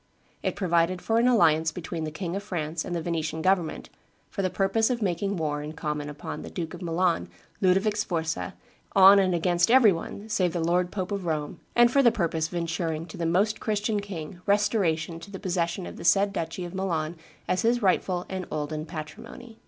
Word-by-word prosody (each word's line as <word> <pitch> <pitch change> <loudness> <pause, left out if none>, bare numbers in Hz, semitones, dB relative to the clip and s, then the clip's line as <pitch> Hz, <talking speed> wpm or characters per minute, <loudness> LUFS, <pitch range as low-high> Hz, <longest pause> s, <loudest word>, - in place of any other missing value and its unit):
It - - -1
provided 175 -1 +1
for 225 +4 +1
an 240 - +4
alliance 160 -9 +4
between 165 -1 -5
the - - -3
King 170 +3 -4
of 200 - -2
France 165 -5 -3
and 175 - -4
the 165 - -2
Venetian 160 -1 -2
government, 185 -4 0 0.4
for 195 - -3
the 185 - +1
purpose 195 +5 +1
of 245 -2 0
making 195 +1 -1
war 150 -2 -1
in 150 +1 -6
common 150 -2 -3
upon 155 +2 -6
the - - -8
Duke 165 -3 -5
of 175 - -9
Milan, 170 - 0 0.3
Ludovic 195 +3 +3
Sforza, 170 -3 -2 0.4
on 195 +1 +9
and 185 -2 +2
against 175 +2 +2
every 240 -4 +7
one, 190 +4 -5
save 185 -6 +1
the 175 - -1
lord 175 +2 +1
pope 185 0 -4
of 195 -3 -3
Rome, 150 -2 -2 0.2
and 240 0 +6
for 275 - +4
the 240 -3 +6
purpose 165 -6 -1
of 175 - -9
insuring 165 -1 -2
to - - -9
the 170 - -1
Most 200 +6 +2
Christian 210 0 0
king 180 -3 -7
restoration 185 -6 +1
to 200 - -11
the 195 - -7
possession 180 -1 -1
of - - -8
the - - -8
said 200 +3 +4
duchy 170 0 -3
of 175 - -8
Milan 170 -4 -2 0.3
as 185 - +1
his 235 0 +2
rightful 185 -1 +1
and 185 -1 -5
olden 155 +1 -3
patrimony. 180 +8 -9
175 Hz, 205 wpm, -27 LUFS, 160-200 Hz, 0.4 s, on